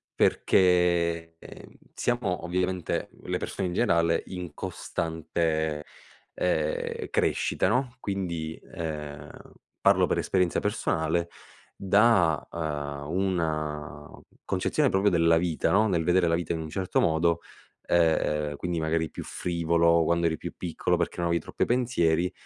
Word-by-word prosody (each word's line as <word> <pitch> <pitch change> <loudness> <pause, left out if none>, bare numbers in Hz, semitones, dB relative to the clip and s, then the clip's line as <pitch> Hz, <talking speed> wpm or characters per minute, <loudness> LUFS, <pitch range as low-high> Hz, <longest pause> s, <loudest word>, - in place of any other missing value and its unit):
perché, 85 -2 +2
ehm, - - -12 0.2
siamo 120 -9 -1
ovviamente, 90 0 -1
le - - -2
persone 95 -2 -3
in - - -4
generale, 85 -7 +2
in 90 -4 -6
costante, 80 -2 -2 0.5
ehm, 80 -4 -1
crescita, - - +1
no, 125 +2 0
quindi, 85 -5 -3 0.2
ehm, 75 -3 -5 0.5
parlo - - +5
per - - 0
esperienza 90 -2 +1
personale, 85 -1 -1 0.5
da, 100 -5 +3
uhm, 75 -3 -4
una 75 -5 -2 0.3
concezione 130 +10 +1
proprio 100 0 +3
della 85 -2 +4
vita, 85 -1 0
no, 110 +2 +4
nel 85 -5 +1
vedere 90 +1 +3
la 85 - +3
vita 85 -1 -2
in 80 - -3
un 80 - -5
certo 95 +3 -1
modo, 85 +1 +2 0.5
ehm, 75 -3 +2
quindi 90 0 -2
magari 80 0 0
più - - -7
frivolo 85 -1 +2
quando 85 +1 +1
eri 80 -1 +2
più - - -7
piccolo 85 -3 -1
perché - - -2
non 85 -1 0
avevi 85 -1 +1
troppi - - -2
pensieri, 90 -9 +1
85 Hz, 130 wpm, -27 LUFS, 80-90 Hz, 0.5 s, parlo